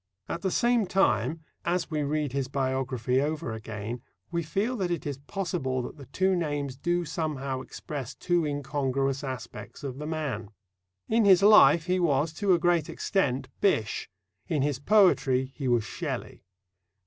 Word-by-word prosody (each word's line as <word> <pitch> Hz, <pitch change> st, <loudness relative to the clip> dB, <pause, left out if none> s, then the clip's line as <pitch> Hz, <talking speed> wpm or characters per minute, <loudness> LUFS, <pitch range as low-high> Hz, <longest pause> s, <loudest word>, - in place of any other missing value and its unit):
At 170 Hz, -, -4 dB
the 190 Hz, -, 0 dB
same 235 Hz, +1 st, +2 dB
time, 165 Hz, -, +2 dB, 0.2 s
as 175 Hz, -1 st, -1 dB
we 155 Hz, -1 st, 0 dB
read 145 Hz, -1 st, -1 dB
his 135 Hz, -2 st, -1 dB
biography 130 Hz, -2 st, 0 dB
over 150 Hz, -4 st, -2 dB
again, 110 Hz, +1 st, -5 dB, 0.3 s
we 170 Hz, -1 st, 0 dB
feel 200 Hz, +10 st, -1 dB
that 185 Hz, -4 st, -1 dB
it 170 Hz, -3 st, -2 dB
is 140 Hz, -2 st, -4 dB
possible 145 Hz, -6 st, -2 dB
that 140 Hz, -, -8 dB
the 140 Hz, -3 st, -11 dB
two 190 Hz, +7 st, +1 dB
names 145 Hz, -6 st, -2 dB
do 175 Hz, +5 st, 0 dB
somehow 140 Hz, -5 st, -3 dB
express 135 Hz, -1 st, -7 dB
two 175 Hz, -1 st, +1 dB
incongruous 140 Hz, -2 st, -1 dB
aspects 130 Hz, +1 st, -7 dB
of 135 Hz, -1 st, -5 dB
the 150 Hz, -, -5 dB
man. 155 Hz, -9 st, -3 dB, 0.6 s
In 225 Hz, -1 st, +3 dB
his 190 Hz, -1 st, +6 dB
life 170 Hz, -7 st, +7 dB
he 185 Hz, 0 st, +1 dB
was, 155 Hz, -2 st, +2 dB
to 195 Hz, +4 st, +1 dB
a -, -, +2 dB
great 170 Hz, -2 st, +2 dB
extent, 135 Hz, -9 st, 0 dB
Bysshe; 115 Hz, -, +1 dB, 0.4 s
in 150 Hz, -4 st, +1 dB
his 145 Hz, -2 st, 0 dB
poetry 140 Hz, -8 st, +3 dB
he 135 Hz, -, -3 dB
was 120 Hz, -3 st, +3 dB
Shelley. -, -, -5 dB
145 Hz, 160 wpm, -28 LUFS, 130-175 Hz, 0.6 s, life